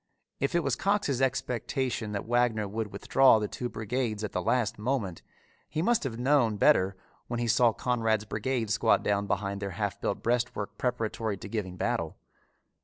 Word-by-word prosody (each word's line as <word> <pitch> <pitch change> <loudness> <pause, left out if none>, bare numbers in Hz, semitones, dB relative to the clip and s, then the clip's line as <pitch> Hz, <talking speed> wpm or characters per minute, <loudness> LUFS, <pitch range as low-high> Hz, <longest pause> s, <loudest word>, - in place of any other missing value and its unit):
If 140 +4 0
it 170 - +2
was 140 -4 +1
Cox's 195 -8 0
expectation 125 -3 -1
that 100 - -3
Wagner 120 -3 +1
would 105 +1 -4
withdraw 135 -4 +5
the 105 -1 -1
two 120 +3 -4
brigades 110 -1 -2
at 105 - -3
the 90 - -1
last 110 +1 0
moment, 105 -7 -2 0.5
he 155 +1 -1
must 235 +3 +2
have 115 -4 -3
known 125 -4 +3
better 100 -8 +4 0.3
when 120 -1 -3
he 120 - -1
saw 115 +1 +4
Conrad's 115 -3 0
brigade 110 +2 -2
squat 115 0 +3
down 100 0 0
behind 100 0 -2
their 100 - -2
half 105 -3 -2
built - - -2
breastwork 115 -4 -1
preparatory 115 -4 -1
to 95 - -8
giving 95 -4 -4
battle. - - -1
115 Hz, 175 wpm, -29 LUFS, 105-125 Hz, 0.5 s, withdraw